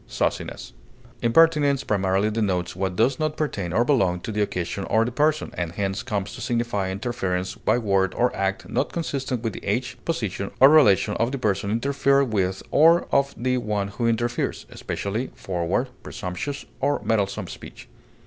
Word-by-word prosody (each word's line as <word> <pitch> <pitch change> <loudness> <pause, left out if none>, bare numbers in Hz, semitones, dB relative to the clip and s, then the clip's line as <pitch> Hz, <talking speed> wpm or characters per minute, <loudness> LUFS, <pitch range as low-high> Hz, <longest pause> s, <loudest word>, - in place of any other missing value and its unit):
forwardness, - - -3 0.5
Impertinence 145 +2 +4
primarily 100 +1 +1
denotes 95 -6 -1
what 95 -1 -2
does 125 +6 +2
not 155 -1 -1
pertain 100 - -2
or 115 +7 +2
belong 95 -11 +2
to 110 - -6
the 105 0 -1
occasion 90 -1 -2
or 110 +1 +2
the 120 - -3
person, 150 +4 +1
and 85 -1 -3
hence 95 0 -2
comes 100 -5 -3
to 120 - -8
signify 115 -5 -1
interference 95 -3 -2
by - - +1
word 100 -5 +1
or 125 +1 +1
act 95 0 -2
not - - -1
consistent 135 -7 -3
with 115 -3 -2
the - - -9
age, 120 +6 -2
position, 110 - -2
or 135 - +9
relation 110 -9 +5
of 115 +2 +1
the 140 - -2
person 100 -5 0
interfered 140 +2 +2
with 95 -2 0
or 165 +3 +5
of 140 0 +2
the 125 +1 0
one 105 -3 -2
who 115 +4 -2
interferes; 120 +1 -1
especially, 110 +6 -3
forward, 90 +7 -1
presumptuous, 100 +11 -5
or 145 +2 +1
meddlesome 100 -3 0
speech. - - -11
110 Hz, 165 wpm, -24 LUFS, 95-130 Hz, 0.5 s, or